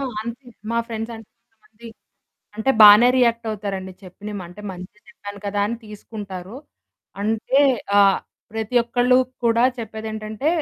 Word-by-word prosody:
ఆ! - - -3 0.2
అంతే. 235 +3 -8 0.2
మా 230 - 0
ఫ్రెండ్స్ 225 0 -5
అంటే 225 -2 -14 0.2
కొంతమంది 220 +1 -16 0.7
అంటే 220 +5 +1
బానే 210 +4 +9
రియాక్ట్ 235 -2 +2
అవుతారండి. 195 -3 -5
చెప్పిన‌మ 205 +2 -8
అంటే 180 +4 -12
మంచె 185 +3 -10
చెప్పాను 205 -3 -10
కదా 205 0 -1
అని 235 +2 -3
తీసుకుంటారు. 205 -1 -9 0.7
అంటే 225 +6 +1 0.4
ఆహ్, 195 -1 +5 0.3
ప్రతి 225 +2 -3
ఒక్కళ్ళు 245 +1 +2 0.3
కూడా 230 +1 +3 0.2
చెప్పేది 220 -1 -6
ఏంటంటే 215 +6 -3
220 Hz, 135 wpm, -22 LUFS, 205-235 Hz, 0.7 s, బానే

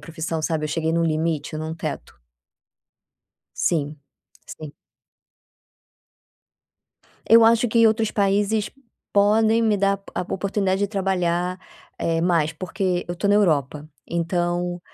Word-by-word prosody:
profissão, 165 -1 -4
sabe. 155 -1 -1
Eu - - -3
cheguei 160 +1 -1
num 170 0 +1
limite, 155 -1 -1
num 160 +1 -4
teto. - - -6 1.4
Sim, 150 -2 -1 0.6
sim. 155 -2 -9 2.6
Eu 230 0 +7
acho 230 +1 +4
que 230 +1 +4
outros 220 0 +1
países 205 +1 0 0.4
podem 220 +3 +3
me 215 -2 +2
dar 200 0 +1 0.2
a - - -1
a 180 - -5
oportunidade 195 0 -1
de 205 - +2
trabalhar, 180 -2 -1 0.4
eh, 165 0 0
mais, 165 -3 +1
porque 180 +2 -2
eu 175 - -3
tô 190 +4 -3
estou - - +3
na 205 - +5
Europa. 150 -6 0 0.2
Então 175 +1 -2
180 Hz, 130 wpm, -22 LUFS, 165-205 Hz, 2.6 s, Eu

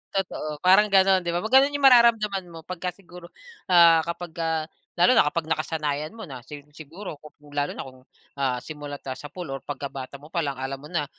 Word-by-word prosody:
Totoo. 155 -6 -3
Parang 190 +3 +6
ganun, 190 -1 +5
'di 175 - -2
ba? 175 - 0
Pag 220 +3 -4
ganun 280 +1 0
yung 285 -1 +1
mararamdaman 225 -6 +5
mo, 165 - -9
pagka 180 0 -4
siguro, 175 -2 -14 0.4
ah, 170 -2 +7
kapagka 165 -2 -3 0.3
lalo 175 +9 +5
na 150 - +5
kapag 170 0 -3
nakasanayan 155 -2 -2
mo 220 - -7
na, 130 -6 -9
sig 145 +3 -11
siguro 160 +1 -9
kung 150 -1 -16
lalo 145 0 -1
na - - -5
kung, 130 -1 -13 0.4
ah, 130 -2 0
simula 145 -1 -7
tapos 130 -2 -7
sapul 175 +4 -7
or 135 - -4
pagkabata 140 -1 -7
mo 145 +2 -15
palang 145 -6 -1
alam 135 +1 -5
mo 150 - -11
na 165 -4 -1
160 Hz, 200 wpm, -25 LUFS, 145-185 Hz, 0.4 s, ah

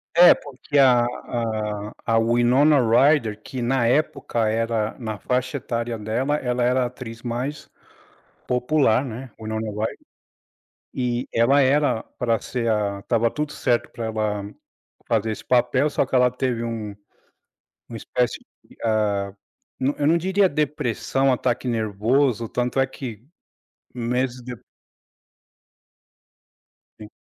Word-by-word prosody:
É, 175 +1 +9
porque 145 +1 -5
a 125 -3 +6
a 110 -4 -3
a 115 -1 +2
Winona 120 +6 +4
Ryder, 115 -2 +3
que 130 +3 -6
na 120 0 +1
época 120 -4 0
era, 115 -1 -1
na 110 -3 -4
faixa 125 +2 -1
etária 115 -1 -3
dela, 115 +7 -1
ela 125 -3 -1
era 125 +1 +2
a - - 0
atriz 120 -2 -9
mais 125 +5 -4 0.8
popular, 125 0 +2
né, 125 +1 -7
o 110 - -10
Winona 110 0 -3
Ryder. 105 +2 -3 1.0
E, 125 -1 -2
ela 125 +5 +4
era 140 -3 +2 0.2
para 115 -2 +1
ser 120 -2 -2
a 100 -2 -1
estava 115 +3 +1
tudo 150 -1 -3
certo 120 -1 0
pra 115 - -5
ela 105 -2 -2 0.6
fazer 110 -1 0
esse - - -8
papel, 125 +3 +2
só 145 - +1
que 130 - -6
ela 125 -1 +5
teve 125 -2 -2
um 110 -3 -4 0.9
uma 115 - -7
espécie 120 +2 -1 0.3
e - - -20
ah, 105 -3 0 0.5
eu 130 - 0
não 145 - 0
eu 145 - +1
não 165 +3 +4
diria 190 +3 +2
depressão, 140 -3 0
ataque 125 0 -1
nervoso, 115 +2 +1
tanto 125 +3 -2
é 135 - +4
que, 125 -4 -8 0.7
meses 125 +1 -2
dep 120 -3 -8 2.4
Sim. 105 -1 -10
120 Hz, 135 wpm, -23 LUFS, 110-130 Hz, 2.4 s, É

